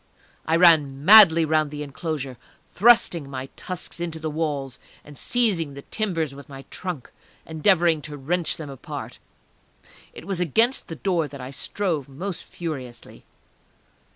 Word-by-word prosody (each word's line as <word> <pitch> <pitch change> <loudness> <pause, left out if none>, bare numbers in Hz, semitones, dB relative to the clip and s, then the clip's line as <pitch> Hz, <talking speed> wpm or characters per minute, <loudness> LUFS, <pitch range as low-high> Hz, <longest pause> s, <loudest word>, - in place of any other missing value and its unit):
I 160 - +2
ran 150 -5 +4
madly 185 -5 +9
round 155 -1 +1
the 150 0 -6
enclosure, 140 -3 -5 0.3
thrusting 180 -9 +3
my 135 -1 -6
tusks 180 -1 -7
into 170 -2 -4
the 155 0 -4
walls, 145 -5 -3 0.2
and 145 - -13
seizing 180 - 0
the 140 - -9
timbers 165 -9 -2
with 140 0 -12
my 135 -1 -10
trunk, 175 -9 -6 0.3
endeavouring 165 0 +2
to 145 - -7
wrench 155 +3 -1
them 150 -3 -7
apart. 135 - -8 0.9
It - - -11
was 195 -2 -3
against 225 - +2
the 165 - -6
door 170 -2 0
that 140 -1 -11
I 130 +1 -7
strove 155 0 -3
most 175 +7 -6
furiously.... 135 -8 -8
160 Hz, 145 wpm, -24 LUFS, 140-175 Hz, 0.9 s, madly